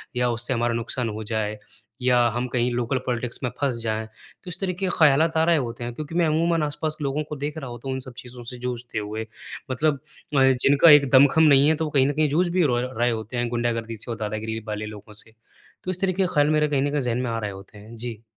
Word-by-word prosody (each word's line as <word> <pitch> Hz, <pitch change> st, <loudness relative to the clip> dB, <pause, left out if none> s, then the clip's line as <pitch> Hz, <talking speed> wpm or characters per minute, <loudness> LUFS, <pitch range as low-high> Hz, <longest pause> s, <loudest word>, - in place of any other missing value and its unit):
या 125 Hz, 0 st, +1 dB
उससे 120 Hz, +2 st, -1 dB
हमारा 120 Hz, -1 st, 0 dB
नुकसान 115 Hz, +1 st, -2 dB
हो 110 Hz, +1 st, -5 dB
जाए 110 Hz, -1 st, -2 dB, 0.4 s
या 125 Hz, 0 st, +3 dB, 0.2 s
हम 120 Hz, +1 st, -1 dB
कहीं 125 Hz, 0 st, +1 dB
लोकल 120 Hz, +2 st, 0 dB
पॉलिटिक्स 120 Hz, -1 st, -2 dB
में 125 Hz, -, 0 dB
फँस 140 Hz, -4 st, 0 dB
जाएँ, 110 Hz, -1 st, -2 dB
तो 110 Hz, +10 st, -22 dB
इस 170 Hz, -, -4 dB
तरीक़े 190 Hz, 0 st, -2 dB
के -, -, 0 dB
ख़यालात 155 Hz, +1 st, +4 dB
आ 160 Hz, -, +4 dB
रहे 170 Hz, -1 st, +4 dB
होते 120 Hz, -3 st, -4 dB
हैं, 120 Hz, 0 st, -4 dB
क्योंकि 155 Hz, +4 st, -7 dB
मैं 175 Hz, -1 st, +3 dB
अमूमन 165 Hz, +1 st, +1 dB
आस-पास 150 Hz, +1 st, -3 dB
लोगों 145 Hz, +1 st, -1 dB
को 150 Hz, -, -4 dB
देख 145 Hz, +2 st, -4 dB
रहा 135 Hz, -5 st, -6 dB
होता 120 Hz, +2 st, -9 dB
हूँ -, -, -1 dB
तो -, -, -2 dB
इन -, -, -3 dB
सब 130 Hz, -, -10 dB
चीज़ों 125 Hz, -1 st, -10 dB
से 125 Hz, +1 st, -8 dB
जूझते 120 Hz, -2 st, -4 dB
हुए, 110 Hz, +1 st, -5 dB, 0.5 s
मतलब 145 Hz, +2 st, +1 dB, 0.4 s
अ, -, -, +5 dB, 0.2 s
जिनका 145 Hz, +4 st, +6 dB
एक 145 Hz, -2 st, +7 dB
दमखम 140 Hz, +4 st, +6 dB
नहीं 140 Hz, -2 st, +6 dB
है 160 Hz, -, +3 dB
तो 160 Hz, -, -2 dB
वो 150 Hz, -, -4 dB
कहीं 135 Hz, -2 st, +3 dB
न -, -, +1 dB
कहीं 155 Hz, 0 st, +1 dB
जूझ 170 Hz, +6 st, +2 dB
भी 180 Hz, +1 st, +2 dB
रॉय 125 Hz, -4 st, +1 dB
रहे 120 Hz, +1 st, +2 dB
होते 110 Hz, +2 st, -4 dB
हैं 120 Hz, 0 st, 0 dB
गुंडागर्दी 115 Hz, -1 st, -2 dB
से 115 Hz, +3 st, -6 dB
और 115 Hz, -, -4 dB
दादागिरी 110 Hz, +1 st, -3 dB
वाले 105 Hz, 0 st, -3 dB
लोगों 105 Hz, 0 st, -10 dB
से, 110 Hz, +2 st, -11 dB, 0.5 s
तो 185 Hz, -, -2 dB
इस 185 Hz, -, -3 dB
तरीक़े 190 Hz, 0 st, +1 dB
के 180 Hz, -, -2 dB
ख़्याल 145 Hz, 0 st, +3 dB
मेरे 150 Hz, 0 st, +3 dB
कहीं 140 Hz, -2 st, +1 dB
न 145 Hz, -, +1 dB
कहीं 145 Hz, 0 st, 0 dB
ज़हन 120 Hz, -2 st, -1 dB
में 125 Hz, -, -2 dB
आ 115 Hz, -, -2 dB
रहे 105 Hz, -2 st, -3 dB
होते 95 Hz, +2 st, -12 dB
हैं। 110 Hz, +3 st, -12 dB
जी। 115 Hz, -1 st, -7 dB
125 Hz, 265 wpm, -24 LUFS, 115-150 Hz, 0.5 s, एक